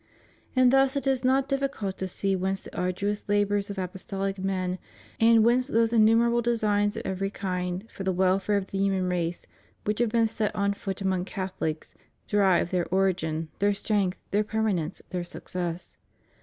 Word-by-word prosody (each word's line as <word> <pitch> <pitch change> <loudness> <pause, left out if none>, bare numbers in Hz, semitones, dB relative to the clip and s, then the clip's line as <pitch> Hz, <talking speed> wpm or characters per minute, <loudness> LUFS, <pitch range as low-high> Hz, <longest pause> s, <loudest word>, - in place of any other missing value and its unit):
And 255 0 +5
thus 270 0 +4
it 280 - -2
is 265 -1 +1
not 265 +1 +3
difficult 275 -8 -2
to 190 - -1
see 195 +1 -1
whence 190 +1 -1
the - - -12
arduous 185 +4 -1
labors 205 0 +1
of 200 - -5
apostolic 195 +1 -4
men, 185 -1 -1 0.4
and 225 -1 +6
whence 250 +2 +3
those 230 -3 +2
innumerable 230 +2 +4
designs 215 -2 +1
of - - -5
every 195 +1 -1
kind 180 -1 -3
for - - -9
the 190 - +1
welfare 190 +2 +2
of 195 - -2
the 195 - -2
human 195 -2 +1
race 175 -1 -2 0.4
which 210 +1 -1
have 240 -2 +2
been 230 0 +3
set 215 -1 -2
on 200 -1 +1
foot 195 -1 -5
among 190 -2 0
Catholics, 185 -6 -4 0.3
derive 195 -4 +2
their 180 -2 0
origin, 165 -4 0
their 205 +1 +3
strength, 200 -2 0
their 205 +1 +2
permanence, 205 -6 -1
their 180 -2 -2
success. 175 0 -5
195 Hz, 170 wpm, -27 LUFS, 185-220 Hz, 0.4 s, and